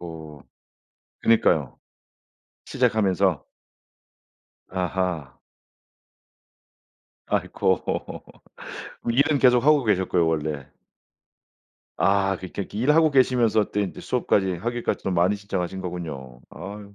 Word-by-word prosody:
어. 80 -3 -9 0.8
그러니까요. 80 - +2 0.9
시작하면서. 100 - +1 1.3
아하. 90 -6 -3 1.9
아이고 - - 0 1.3
일은 140 +4 +3
계속하고 130 +3 +4
계셨고요 95 -5 +2
원래. 75 -3 -2 1.3
아, 95 0 +2
그러니까 95 +2 -6
일하고 150 +8 +3
계시면서 120 -5 +2
또 105 - 0
인제 100 -3 -4
수업까지, 100 -6 0
학위까지 120 +7 -3
좀 95 - -1
많이 90 +4 +3
신청하신 95 -2 -4
거군요. 75 -9 -7
아유. 100 +3 -9
95 Hz, 225 characters per minute, -24 LUFS, 85-115 Hz, 1.9 s, 계속하고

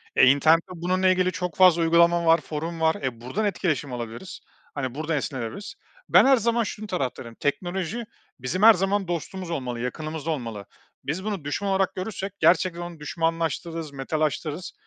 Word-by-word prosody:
E, - - +7
internette 155 +5 +4
bununla 185 +2 +1
ilgili 185 0 +2
çok 180 -2 -4
fazla 180 -3 +6
uygulama 170 +1 +4
var, 165 0 +5
forum 160 +2 -5
var, 160 0 +3
e, 120 -3 -4
buradan 175 - -2
etkileşim 165 -8 -1
alabiliriz, 120 +9 -7 0.4
hani, 130 -3 -3
buradan 155 +1 -1
esinlenebiliriz. 135 - -5 0.3
Ben - - +7
her 270 -1 +6
zaman 235 +1 +1
şunun 215 0 -6
taraftarıyım. 130 - -4
Teknoloji 180 +8 -2 0.4
bizim 150 +11 -2
her 225 0 +10
zaman 195 +1 0
dostumuz 175 +1 -4
olmalı, 125 -6 -3
yakınımızda 155 +5 -4
olmalı. 115 -9 -5 0.4
Biz 170 +7 -3
bunu 205 -6 -3
düşman 195 +7 -2
olarak 190 -1 +1
görürsek 195 0 -5
gerçekten 170 +1 +3
onu 175 -2 -7
düşmanlaştırırız, 165 0 -2
metalaştırız 155 - -2
165 Hz, 155 wpm, -25 LUFS, 145-185 Hz, 0.4 s, her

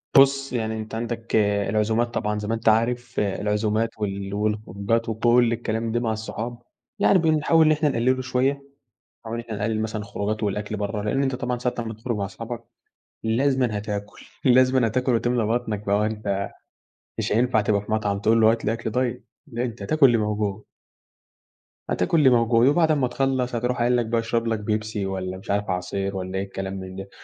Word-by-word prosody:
بُص، 135 0 +5
يعني 110 -2 -2
أنتَ 110 +1 -6
عندك 115 0 -3 0.3
العزومات 110 +3 +1
طبعًا 105 0 -1
زي 105 - -5
ما 110 - 0
أنتَ 115 0 +2
عارف 120 +2 +1
العزومات 105 +2 0
وال 100 -2 -3
والخروجات 105 +1 -1
وكل 120 +1 +3
الكلام 115 -1 -2
ده 120 - +1
مع 115 -2 0
الصحاب 115 +2 -5 0.4
يعني 195 - +5
بنحاول 160 0 +3
إن 155 - +5
إحنا 150 0 +2
نقلله 130 +1 +1
شوية، 130 +1 +1 0.7
بنحاول 115 0 -6
إن 115 - -5
إحنا 115 -2 -5
نقلل 110 +1 -1
مثلًا 110 -1 -3
الخروجات 105 +1 -3
والأكل 105 +1 -2
بره، 105 +1 -3
لإن 120 +7 0
أنتَ 135 -1 0
طبعًا 125 -1 -2
ساعة 125 0 -1
أمّا 115 -1 -3
تخرج 115 +2 -3
مع 100 - -1
أصحابك 115 +4 -7 0.6
لازمًا 125 0 +1
هتاكل، 105 0 -6 0.2
لازمًا 130 -1 +5
هتاكل 125 +3 0
وتملى 120 0 +1
بطنك 110 -2 -1
بقى 100 - +2
ما 105 - +2
هو - - +2
أنتَ 105 -2 -2 0.7
مش - - -1
هينفع 115 0 +3
تبقى 105 -1 +1
في 110 - -7
مطعم 105 -2 0
تقول 115 +2 +3
له 110 0 +6
هات 115 0 -2
لي 110 - +1
أكل 115 -1 -4
دايت 120 -2 -2 0.2
لأ 120 -3 -3
أنتَ 115 -3 -6
هتاكل 140 +9 +3
اللي 120 -3 +5
موجود. 105 -1 -1 1.3
هتاكل 90 - +1
اللي 145 -4 +6
موجود، 115 0 +4
وبعد 160 +2 +4
أمّا 140 -4 +2
تخلص 130 -1 -1
هتروح 125 +1 -1
قايل 120 +1 +3
لك 120 - +1
بقى 115 +1 0
اشرب 115 0 -1
لك 115 -1 0
بيبسي 105 -1 -2
والّا 95 -1 -3
مش 95 - -6
عارف 100 0 0
عصير 95 +2 -2
والّا 95 0 -4
إيه 95 - -1
الكلام 95 0 -5
من 95 0 -8
ده، 95 +1 -7
115 Hz, 195 wpm, -24 LUFS, 105-125 Hz, 1.3 s, له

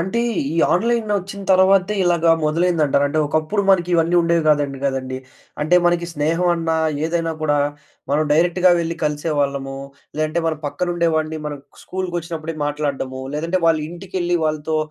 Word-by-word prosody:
అంటే, 190 +7 -1 0.3
ఈ - - -3 0.2
ఆన్‌లైనొచ్చిన 205 -2 0
తర్వాతే 190 +1 +4
ఇలాగా 170 -2 +3
మొదలైందంటార? 155 -2 +2
అంటే, 155 +2 -1
ఒకప్పుడు 155 +7 0
మనకివన్నీ 175 -2 +2
ఉండేవి 170 -1 +2
గాదంట 145 -2 +2
గదండీ. 130 -1 -2 0.4
అంటే 155 +4 +3
మనకి 175 0 +1
స్నేహం 165 +4 0
అన్నా 165 -1 -1 0.3
ఏదైనా 165 0 -1
కూడా, 145 -1 +2 0.5
మనం 145 +2 +2
డైరెక్ట్‌గా 175 +3 +3
వెళ్లి 165 0 -3
కలిసేవాళ్ళము. 145 -3 -1 0.4
లేదంటే, 155 +2 0
మన 160 - +1
పక్కన 175 +5 -3
ఉండేవాడిని 160 -2 0
మనం 145 -1 -5 0.2
స్కూల్‌కొచ్చినప్పు‌డికి 170 -4 -5
మాట్లాడడము. 140 -3 -3
లేదంటే, 170 +4 -1
వాళ్ళింటికెళ్ళి 175 +3 -1
వాళ్ళతో 155 0 -1
165 Hz, 130 wpm, -20 LUFS, 150-175 Hz, 0.5 s, తర్వాతే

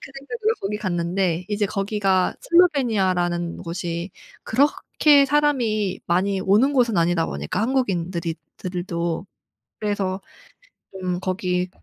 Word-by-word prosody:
그 - - -11
생각으로 440 - -1
거기 205 +2 -2
갔는데 180 -2 -1
이제 205 0 0
거기가 195 -2 0
슬로베니아라는 200 - +2
곳이 170 +1 -4 0.3
그렇게 285 +2 +3
사람이 245 -9 +1
많이 190 +3 +1
오는 215 +10 +3
곳은 240 -5 +2
아니다 165 -1 +2
보니까 75 - -3
한국인들이 180 -9 -1 0.2
들도 175 -1 -3 0.5
그래서 200 -2 -1 0.7
좀 185 -2 -3
거기 185 -1 -1
190 Hz, 280 characters per minute, -23 LUFS, 175-230 Hz, 0.7 s, 그렇게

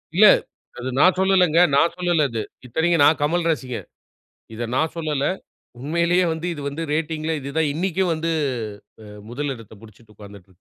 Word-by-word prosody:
இல்ல 210 +3 +8 0.5
அது 130 +2 -4
நான் 185 +5 +5
சொல்லலங்க. 185 -4 +3 0.2
நான் 165 +4 +3
சொல்லல 175 -4 +1
அது. 115 -1 -3 0.2
இத்தனைக்கும் 160 +5 +2
நான் 155 +2 +4
கமல் 170 +3 0
ரசிகன். 130 -5 -5 0.7
இத 115 - -5
நான் 160 +4 0
சொல்லல. 150 -4 -2 0.6
உண்மையிலேயே 170 +5 +1
வந்து 160 +2 -4
இது 145 - -8
வந்து 150 +4 -5
ரேட்டிங்ல 160 0 -2
இது 140 - -6
தான் 160 -2 +2
இன்னைக்கும் 185 +2 0
வந்து 160 +1 -2 0.7
அ - - -12 0.3
முதல் 140 +3 -3
எடத்த 110 -1 -14
புடிச்சிட்டு 110 0 -17
உக்காந்துட்டு 100 -1 -12
இருக்கு. 90 - -24
155 Hz, 165 wpm, -22 LUFS, 135-170 Hz, 0.7 s, இல்ல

